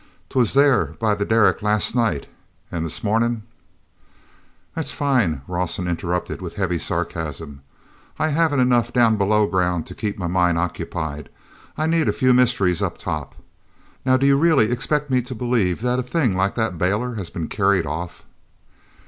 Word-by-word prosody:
'Twas 125 -2 +1
there 130 - +3
by 110 -2 +2
the 105 0 -1
derrick 110 -1 +3
last 105 +1 +1
night, 115 - 0 0.5
and 85 -1 -2
this 80 - -4
marnin'—" 115 +1 +1 1.3
"That's 160 - -2
fine," 120 - 0
Rawson 90 0 -2
interrupted 90 +2 -3
with 90 -2 -6
heavy 90 -4 -1
sarcasm. 75 -4 -4 0.6
"I 155 - +1
haven't 155 -3 +2
enough 125 -2 +2
down 115 -3 +3
below 105 +1 +3
ground 90 -4 0
to - - -9
keep 105 -2 -4
my 95 - -4
mind 90 -1 +2
occupied—I 85 - -5
need 165 -1 +2
a - - +1
few 130 -2 +3
mysteries 115 -9 +2
up - - -2
top. 75 -3 -5 0.7
Now 130 0 +3
do 135 - +1
you 140 0 +5
really 145 -9 +4
expect 145 +3 -1
me 130 -1 +3
to 125 +1 -7
believe 110 -6 0
that 125 0 +1
a - - +1
thing 125 - 0
like 95 +1 0
that 110 -7 -2
bailer 105 +7 0
has 100 -6 -5
been 85 -5 -5
carried 100 -4 +1
off?" 85 +4 -6
105 Hz, 165 wpm, -22 LUFS, 90-125 Hz, 1.3 s, you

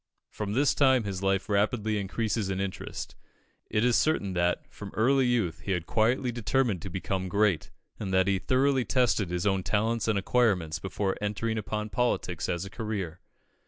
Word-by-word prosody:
From 105 -1 -4
this 140 +5 +3
time 130 -4 +4
his 95 -2 -4
life 95 0 +1
rapidly 105 +1 +1
increases 105 +1 -1
in 95 -1 -2
interest. 95 -1 -5 0.6
It 110 +2 +1
is 125 -1 +3
certain 130 -12 +1
that, 85 0 0
from 100 - -8
early 130 +3 +3
youth, 115 -9 0
he 100 - -2
had 90 -3 -2
quietly 120 +3 +1
determined 120 -4 0
to 95 - -6
become 95 +1 -3
great, 100 -4 +1 0.3
and 95 -3 -3
that 95 0 +4
he 100 -1 +1
thoroughly 130 +4 +2
tested 120 -7 +1
his 90 +1 -2
own 95 -2 +2
talents 110 +5 0
and 110 -2 +2
acquirements 95 -7 +1
before 95 +1 -2
entering 110 +2 -1
upon 105 0 -3
politics 90 - -1
as 85 +2 -1
a - - -7
career. 100 -7 -4
105 Hz, 175 wpm, -28 LUFS, 95-115 Hz, 0.6 s, time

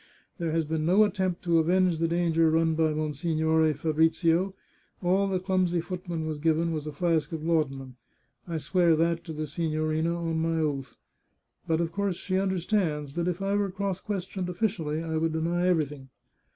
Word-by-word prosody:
There 165 -2 -1
has 165 0 +1
been 155 0 -2
no 185 +6 +5
attempt 190 -4 -1
to 170 -2 +3
avenge 175 0 +2
the 165 - +2
danger 165 -1 +2
run 160 0 +2
by 160 0 +2
Monsignore 160 +1 +1
Fabrizio; 165 +4 +2 0.5
all 190 +3 +2
the 190 -1 0
clumsy 185 -2 +1
footman 175 -2 -4
was 155 -2 -3
given 165 +2 +1
was 155 -2 -3
a - - -3
flask 160 0 0
of 160 -1 -4
laudanum. 135 -6 -1 0.5
I 165 -2 -2
swear 170 +1 +3
that 165 +1 +1
to 165 - -6
the 155 0 -3
signorina 155 +1 -1
on 165 -1 -2
my 165 0 0
oath. 140 -6 -2 0.7
But 160 0 +1
of 170 -1 -1
course 200 0 -1
she 185 +1 -1
understands 180 -6 -1
that 170 +2 -1
if 180 +2 -2
I 195 +1 0
were 205 -1 +1
cross 195 0 -3
questioned 190 -2 -4
officially 170 -5 -1
I 160 -1 -1
should 165 0 0
deny 170 +3 0
everything. 150 -6 -1
165 Hz, 180 wpm, -27 LUFS, 155-180 Hz, 0.7 s, no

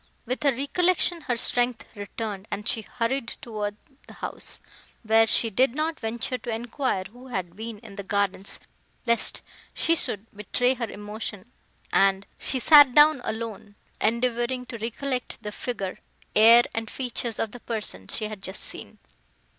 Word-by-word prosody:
With 255 +4 -2
her 285 -2 +4
recollection, 345 +6 +2
her 245 - +1
strength 245 0 +1
returned, 205 0 -5
and 210 +2 -4
she 225 - +1
hurried 235 +2 -2
toward 210 -3 -4 0.3
the - - -12
house, - - -5 0.4
where 225 0 +5
she 225 0 +4
did 255 +4 +3
not 315 +2 -1
venture 235 +2 -3
to 240 - -7
enquire 235 -2 -1
who 245 +7 -13
had 185 -8 -4
been 220 +1 -6
in 205 -1 -13
the - - -3
gardens, 200 0 0 0.5
lest 235 -1 +2 0.3
she 330 - +3
should 210 -9 -1
betray 245 +5 +1
her 235 -4 -4
emotion; 210 +1 -6 0.4
and 195 0 +4
she 265 - 0
sat 285 -1 +8
down 295 -2 +7
alone, 220 -2 -5 0.3
endeavouring 240 +2 +1
to 230 -2 -7
recollect 250 +3 -3
the 210 - -4
figure, 205 -4 -4 0.4
air 230 +3 +8
and 225 0 -3
features 245 -3 -2
of 220 - -2
the 245 - -9
person 210 - -4
she 220 - -1
had 210 -2 -6
just 190 +1 -5
seen. - - -5
230 Hz, 155 wpm, -26 LUFS, 210-250 Hz, 0.5 s, sat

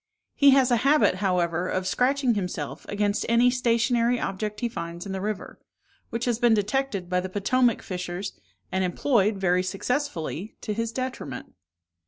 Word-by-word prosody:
He 280 - +5
has 265 -2 +5
a 240 - +5
habit, 275 -5 +3
however, 180 -2 +1
of 185 0 -1
scratching 255 +4 +2
himself 180 -8 -4
against 205 0 0
any 235 +2 +5
stationary 240 0 +2
object 210 +2 -3
he 240 - +1
finds 170 -5 -6
in 200 - -5
the 190 0 -3
river, 210 0 -4 0.5
which 230 +1 -3
has 240 -2 0
been 240 -2 +5
detected 210 -2 -1
by 180 0 +1
the 185 +1 -4
Potomac 230 +5 +1
fishers, 180 +1 -4 0.4
and 190 0 0
employed, 205 +2 +1
very 180 -1 +2
successfully, 195 - -3
to 215 - -3
his 230 +1 -2
detriment. 250 - -5
210 Hz, 160 wpm, -26 LUFS, 185-245 Hz, 0.5 s, He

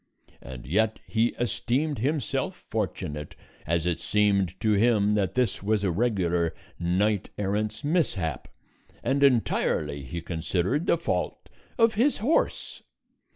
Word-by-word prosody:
And 60 -1 -9
yet 110 - +1
he 115 +1 +1
esteemed 125 +5 0
himself 140 0 -2
fortunate, 75 0 -3 0.3
as 85 +1 +1
it 90 -2 0
seemed 100 -4 +1
to 110 - +1
him 105 -1 +3
that 100 -4 0
this 125 -5 +1
was 105 +1 +1
a 95 - +1
regular 90 -5 0 0.2
knight 95 +4 +1
errant's 105 +5 -2
mishap, 105 - 0 0.6
and 140 +1 +1
entirely, 110 - +2
he 70 +6 -5
considered, 90 - -1
the - - +4
fault 170 - -3 0.3
of 230 -2 +4
his 250 +8 +2
horse. 260 +11 0
105 Hz, 125 wpm, -27 LUFS, 85-125 Hz, 0.6 s, the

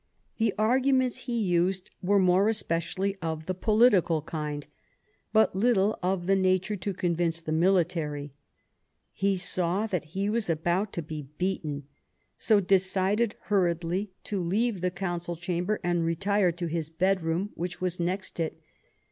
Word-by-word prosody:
The 220 -3 +1
arguments 255 +3 +2
he 235 -1 0
used 180 +1 0
were 200 +3 +3
more 190 +2 +4
especially 195 -1 -1
of 160 -1 -3
the 185 - -1
political 195 -6 +3
kind, 150 -2 -4 0.7
but 220 -3 +3
little 210 0 +2
of 180 -1 -1
the 195 +1 +3
nature 185 +2 +1
to 200 +1 -3
convince 170 -2 0
the 165 -1 -5
Military; 160 -4 +1 0.8
he 195 0 0
saw 180 +2 +1
that 180 -8 -2
he 200 +1 +1
was 215 -2 -1
about 175 +5 0
to 170 - -3
be 150 -2 -7
beaten, 160 -6 -2 0.5
so 215 -2 +3
decided 195 +3 +2
hurriedly 180 0 0
to 200 -3 -3
leave 205 +3 0
the 180 - +1
Council 175 -1 -3
93 - - -17
Sadowa 175 - -10
Chamber 205 +4 -1
and 175 -1 +1
retire 185 +3 +1
to 175 +1 -5
his 165 -1 -2
bedroom, 180 +2 0
which 180 +1 -5
was 180 -1 -2
next 180 +2 -3
it. 160 -1 -2
185 Hz, 150 wpm, -28 LUFS, 170-200 Hz, 0.8 s, more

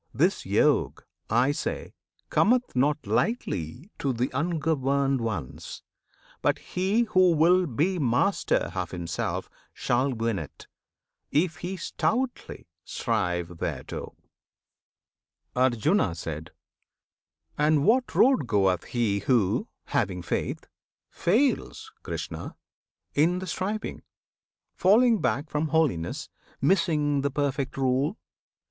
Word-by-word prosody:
This - - +1
Yog, - - +2 0.3
I 120 +5 +3
say, 145 - -4 0.4
Cometh 245 - +2
not 145 +4 +1
lightly 145 - -2
to 140 - 0
th' 125 +1 -1
ungoverned 140 -3 0
ones; 95 - -5 0.6
But - - +2
he 190 +5 0
who 185 -5 +4
will 175 +3 +4
be 165 +8 0
master 135 +9 +1
of 90 -2 -3
himself 85 -2 -3 0.3
Shall 130 +3 +1
win 115 -4 -1
it, 75 - -10 0.6
if 160 +1 +1
he 180 +2 -5
stoutly 225 +10 -2 0.2
strive 85 -1 -2
thereto. - - -5 1.4
Arjuna. 125 - +2 1.4
And 150 -1 +3
what 250 +3 +2
road 255 - +4
goeth 95 -5 +2
he 110 -5 0
who, 115 -5 +1 0.2
having 90 -2 -1
faith, - - -3 0.5
Fails, 280 - 0
Krishna! - - -6 0.6
in 165 +5 +3
the 185 - -4
striving; 200 +4 -3 0.7
falling 220 +2 +4
back 130 +4 0
From 150 +1 0
holiness, 145 - 0 0.3
missing 150 -3 +2
the 140 - 0
perfect 140 -1 -2
rule? 135 - +1
145 Hz, 100 wpm, -27 LUFS, 120-180 Hz, 1.4 s, who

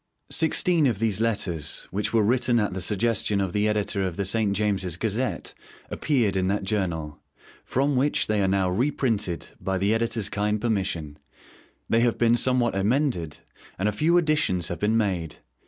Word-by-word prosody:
Sixteen 160 -1 +3
of 115 -5 0
these 110 -1 0
Letters, 85 -10 -2
which 100 +3 -2
were 115 -2 +3
written 120 +2 +2
at 105 -3 -1
the 95 - -4
suggestion 105 +1 +1
of 95 -2 -2
the 105 +1 +1
editor 105 -1 0
of 90 -3 -3
the 100 - -1
'St. 105 0 +1
James's 95 -4 -1
Gazette,' 115 +6 -2 0.4
appeared 120 -10 +1
in 95 -1 +1
that 100 +1 0
journal, 85 -7 -2 0.4
from 140 +2 0
which 140 +3 +1
they 105 -1 0
are 95 - +2
now 95 -1 +1
reprinted, 110 - -1
by 95 0 -2
the 100 +3 +1
editor's 115 -2 0
kind 105 +1 -1
permission. 95 -9 -2 0.7
They 115 - +2
have 120 -1 +2
been 120 0 +4
somewhat 125 0 +2
emended, 100 - 0 0.4
and 95 - 0
a - - +2
few 160 +11 +2
additions 150 - +1
have 85 -3 -4
been 110 +4 +2
made. 90 -8 -1
105 Hz, 170 wpm, -25 LUFS, 95-120 Hz, 0.7 s, been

